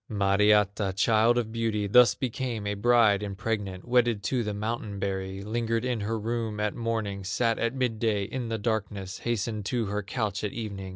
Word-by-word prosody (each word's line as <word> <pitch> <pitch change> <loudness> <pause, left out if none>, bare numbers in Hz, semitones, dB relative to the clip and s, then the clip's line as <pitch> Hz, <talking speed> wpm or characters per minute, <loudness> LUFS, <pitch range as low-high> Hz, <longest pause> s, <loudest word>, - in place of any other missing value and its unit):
Mariatta, 100 -1 +3
child 115 +3 +3
of 115 -2 -1
beauty, 110 -2 -1
Thus 115 +2 +6
became 125 -4 -3
a 105 - -1
bride 110 -1 +4
impregnate, 100 -2 -3
Wedded 120 -4 +2
to 125 +3 0
the 105 - -2
mountain 105 0 -3
berry; 95 0 -3
Lingered 115 +2 -1
in 125 -3 -1
her 110 +2 -2
room 110 -1 -3
at 105 -1 0
morning, 110 -4 -3
Sat 115 +4 0
at 115 +2 0
midday 115 -5 0
in 115 +3 -4
the 115 - -1
darkness, 100 -3 -3
Hastened 110 -2 -2
to 115 +2 0
her 105 +1 -2
couch 105 0 -3
at 105 - -2
evening. 100 -4 -5
110 Hz, 175 wpm, -27 LUFS, 100-115 Hz, -, Thus